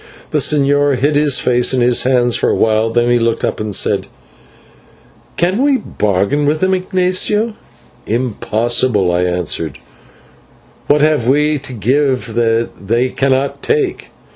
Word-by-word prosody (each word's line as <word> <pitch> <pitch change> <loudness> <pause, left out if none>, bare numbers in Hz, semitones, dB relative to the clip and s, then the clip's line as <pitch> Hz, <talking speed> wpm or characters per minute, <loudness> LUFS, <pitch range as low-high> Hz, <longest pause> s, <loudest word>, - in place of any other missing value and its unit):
The - - +1
señor 145 -1 +2
hid 145 +4 0
his 145 -2 +2
face 125 +1 +1
in 125 - 0
his 120 0 +3
hands 125 -2 +2
for - - 0
awhile, 110 0 +1
then 120 +1 +1
he 120 - +3
looked 115 0 0
up - - -3
and 105 -2 -3
said, - - 0 1.3
"Can 185 +7 0
we 280 -1 +3
bargain 105 - -1
with 155 +1 0
them, 185 +2 +1
Ignatio?" 185 +4 0 0.5
"Impossible," 115 -3 0
I 90 +1 0
answered, 85 -4 -3 1.1
"what 145 0 +3
have 150 -6 +1
we 150 +2 +2
to 135 -1 -9
give 125 +1 0
that 115 0 0 0.2
they 120 +4 +1
cannot 135 +1 -1
take?" 435 -5 -2
130 Hz, 140 wpm, -15 LUFS, 115-150 Hz, 1.3 s, his